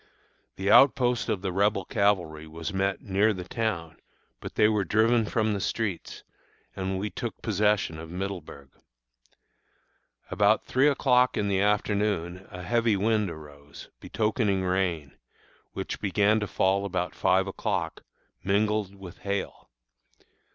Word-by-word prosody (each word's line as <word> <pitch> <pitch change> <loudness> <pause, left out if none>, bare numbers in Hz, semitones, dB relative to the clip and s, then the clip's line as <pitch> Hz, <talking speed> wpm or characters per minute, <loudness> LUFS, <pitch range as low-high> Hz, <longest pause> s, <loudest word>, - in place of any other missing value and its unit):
The 95 +1 0
outpost 125 -3 +4
of 100 -2 -1
the 95 - -1
Rebel 100 +3 +1
cavalry 90 -7 0
was 80 +4 -6
met 95 -1 -1
near 100 +2 +2
the 90 -2 -6
town, 90 -9 -3 0.4
but - - -8
they 105 - +5
were 105 -2 +1
driven 110 +4 +2
from 110 -1 0
the 100 - -3
streets, 100 -6 -3 0.5
and 95 0 -2
we 105 +2 -3
took 120 -2 -5
possession 105 -6 +1
of 80 0 -9
Middleburg. 90 -7 -6 1.6
About 105 +3 +3
three 130 +3 +3
o'clock 130 -3 +3
in 100 -1 0
the 95 -1 +1
afternoon 100 -3 0
a 90 -3 -8
heavy 115 +1 +2
wind 105 0 +1
arose, 75 -3 -12
betokening 105 -3 0
rain, 90 -6 -1 0.6
which - - -5
began 105 +2 +2
to 105 - -3
fall 95 +1 +1
about 90 -3 -2
five 95 +1 +2
o'clock, 95 - -3 0.4
mingled 100 0 0
with 95 -3 -11
hail. 100 -1 -4
100 Hz, 135 wpm, -27 LUFS, 90-105 Hz, 1.6 s, they